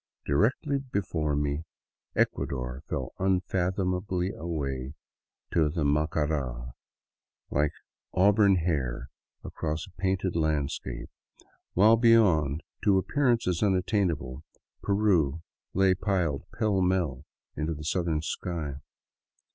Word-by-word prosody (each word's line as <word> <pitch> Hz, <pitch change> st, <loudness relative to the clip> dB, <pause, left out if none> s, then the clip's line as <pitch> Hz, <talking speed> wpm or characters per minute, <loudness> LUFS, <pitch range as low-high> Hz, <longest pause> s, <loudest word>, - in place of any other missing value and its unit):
Directly 125 Hz, -, +1 dB
before 90 Hz, -, -1 dB
me 75 Hz, +1 st, -1 dB, 0.5 s
Ecuador 65 Hz, -1 st, -1 dB
fell -, -, -3 dB
unfathomably 95 Hz, 0 st, 0 dB
away 70 Hz, -6 st, -4 dB, 0.6 s
to 80 Hz, -3 st, +3 dB
the 80 Hz, +1 st, -1 dB
Macara, 70 Hz, -4 st, 0 dB, 0.8 s
like 75 Hz, +2 st, +2 dB
an -, -, -11 dB
auburn 100 Hz, 0 st, +5 dB
hair 65 Hz, -8 st, -1 dB, 0.3 s
across 75 Hz, 0 st, -3 dB
a 95 Hz, -, -17 dB
painted 95 Hz, 0 st, -1 dB
landscape, 70 Hz, -6 st, -2 dB, 0.6 s
while 110 Hz, +5 st, +6 dB
beyond, 90 Hz, -, +4 dB, 0.2 s
to 100 Hz, -2 st, +4 dB
appearances 115 Hz, -, +1 dB
unattainable, 90 Hz, -, 0 dB, 0.4 s
Peru 90 Hz, -7 st, +2 dB, 0.3 s
lay 95 Hz, 0 st, +5 dB
piled 90 Hz, -6 st, -1 dB
pellmell 90 Hz, -, +1 dB, 0.3 s
into 80 Hz, +2 st, -2 dB
the 75 Hz, -, -8 dB
southern 80 Hz, -1 st, 0 dB
sky. 80 Hz, -4 st, -3 dB
85 Hz, 95 wpm, -28 LUFS, 75-95 Hz, 0.8 s, while